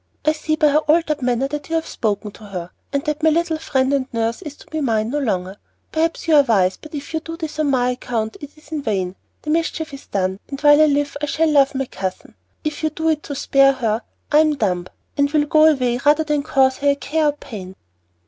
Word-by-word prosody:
I 305 - +5
see 310 0 -1
by 305 -1 +4
her 295 +1 +4
altered 310 -1 +1
manner 250 +1 +1
that 295 +1 -5
you 330 - -1
have 325 - 0
spoken 210 -2 -2
to 210 - -14
her, 180 -3 -6 0.2
and 280 0 -1
that 300 0 -2
my 320 - +5
little 325 0 0
friend 270 -3 0
and 270 -2 0
nurse 230 0 -1
is 300 -2 -8
to - - -17
be 315 0 -2
mine 225 -4 0
no 295 - 0
longer. 190 -7 -2 0.3
Perhaps 330 +1 -1
you 325 - +3
are 295 - +8
wise, 195 -8 +2
but 310 0 -11
if 290 +2 -7
you 320 - 0
do 330 +1 -8
this 315 -2 -6
on 305 -2 +2
my 250 -2 +2
account, 230 -3 -3
it 290 - -7
is 305 - -19
in 310 -2 -2
vain 190 -7 -2 0.3
the 305 - -2
mischief 320 -1 -1
is 275 - -10
done, 190 -1 -1
and 275 - -5
while 295 0 +6
I - - +7
live 290 0 0
I 295 - -1
shall 315 +2 +1
love 275 -2 +4
my 270 0 -1
cousin. 190 -6 -6 0.3
If 305 -2 -3
you 315 - +1
do 320 +1 -1
it 310 -1 +1
to 285 - -6
spare 275 0 +4
her, 230 -4 -1 0.3
I 300 - +6
am 310 -1 +3
dumb, 180 -8 -1 0.3
and 285 0 +3
will 295 0 +2
go 310 +1 +5
away 250 -6 +3
rather 300 +2 +4
than 300 -2 0
cause 265 -2 +2
her 285 - +2
a 280 - +3
care 310 +2 0
or 295 - +2
pain." 205 -10 -9
285 Hz, 250 wpm, -20 LUFS, 235-310 Hz, 0.3 s, are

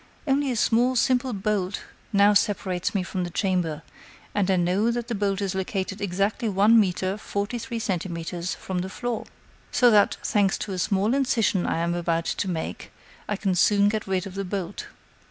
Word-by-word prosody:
Only 280 0 +1
a 250 - -1
small, 240 +3 +2
simple 255 +1 +2
bolt 200 -2 -1 0.3
now 200 0 +5
separates 195 -3 0
me 190 - +1
from 180 0 -3
the 175 - -3
chamber, 175 -4 -1 0.5
and 200 -2 +1
I 190 - +4
know 185 +5 +2
that 235 0 -2
the - - -1
bolt 200 -1 0
is 195 -1 -1
located 190 +1 -3
exactly 200 +4 0
one 210 +4 +5
metre, 190 -1 0
forty 205 +4 -3
three 235 0 -5
centimeters, 175 -3 -3
from 185 -1 -4
the 185 +1 -3
floor. 240 +3 -4 0.4
So 245 -2 +5
that, 205 -2 +4
thanks 200 -2 +2
to 200 - -4
a 185 - -3
small 200 +5 +1
incision 230 -8 +1
I - - 0
am 170 +1 0
about 170 -1 -1
to - - -2
make, 165 -3 -4 0.4
I 210 - +1
can 195 -1 0
soon 200 +3 +4
get 215 -1 -3
rid 190 0 0
of 195 - -8
the 195 +1 -3
bolt." 195 0 -4
200 Hz, 190 wpm, -25 LUFS, 185-215 Hz, 0.5 s, now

